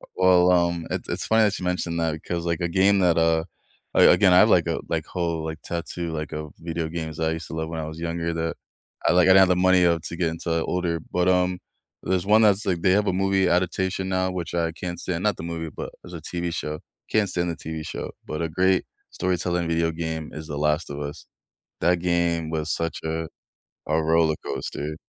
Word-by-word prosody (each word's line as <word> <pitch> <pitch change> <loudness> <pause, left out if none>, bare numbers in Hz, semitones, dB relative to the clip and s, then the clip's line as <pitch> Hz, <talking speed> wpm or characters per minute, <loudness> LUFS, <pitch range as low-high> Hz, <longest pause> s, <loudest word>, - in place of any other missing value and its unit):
Well, 90 -1 +5
um, 85 -2 +2
it's - - -4
it's - - -2
funny 110 0 +4
that 105 -2 +1
you 90 - -5
mentioned 85 -2 -1
that 80 -1 0
because, 85 +2 -4
like, 85 0 -1
a 85 - +1
game 95 +3 +3
that, 90 -3 +3
uh, 80 0 +2 0.5
a - - +7
again, 90 +1 +5
I - - +7
have, - - +6
like, - - +4
a - - -1
like, - - -1
whole, 85 -2 -2
like, 80 -1 -5
tattoo, 85 0 -4
like, 75 -1 -4
of 75 -1 -6
video 80 -1 -3
games 80 -2 -5
that 80 0 0
I - - 0
used 80 0 -6
to - - -7
love 80 0 -3
when 80 0 -4
I 80 - -4
was 80 +1 -8
younger 85 0 -2
that 80 0 -2 0.5
I, - - +5
like, 90 -1 +5
I - - +9
didn't 95 - +8
have 95 - +7
the 90 - +4
money, 90 0 +4
uh, 85 -1 +3
to 85 - -6
get 85 -2 +1
into 80 0 -2
older, 90 -2 -1
but, 90 0 +2
um, 90 0 +2 0.4
there's 95 -1 0
one 105 +2 +5
that's, 105 0 +3
like, 90 -4 0
they 95 - +3
have 105 +2 +3
a - - +2
movie 95 0 +2
adaptation 95 +1 0
now, 95 0 0
which 90 -2 -5
I 85 -1 0
can't 90 +1 -5
stand, 90 -1 -3
not 105 -3 +1
the - - -7
movie, 85 -1 -4
but - - -6
it's 90 - -11
a 85 - -7
TV 85 +2 -3
show, 75 -1 -4 0.3
can't 105 -2 +2
stand 85 -1 -1
the 85 - -3
TV 80 0 -6
show, - - -5 0.2
but 75 - -4
a 80 - -2
great 95 +3 +2 0.3
storytelling 90 -1 -1
video 85 0 +1
game 80 -1 -4
is 80 0 -7
The 75 -2 -5
Last 75 +2 0
of 70 - -5
Us. 70 0 -6 0.6
That 90 0 +3
game 85 -2 0
was 80 0 -2
such 85 0 -2
a 80 0 -2 0.6
a 80 +1 +2
roller 80 0 +3
coaster. 75 +1 -4
85 Hz, 235 wpm, -24 LUFS, 80-90 Hz, 0.6 s, I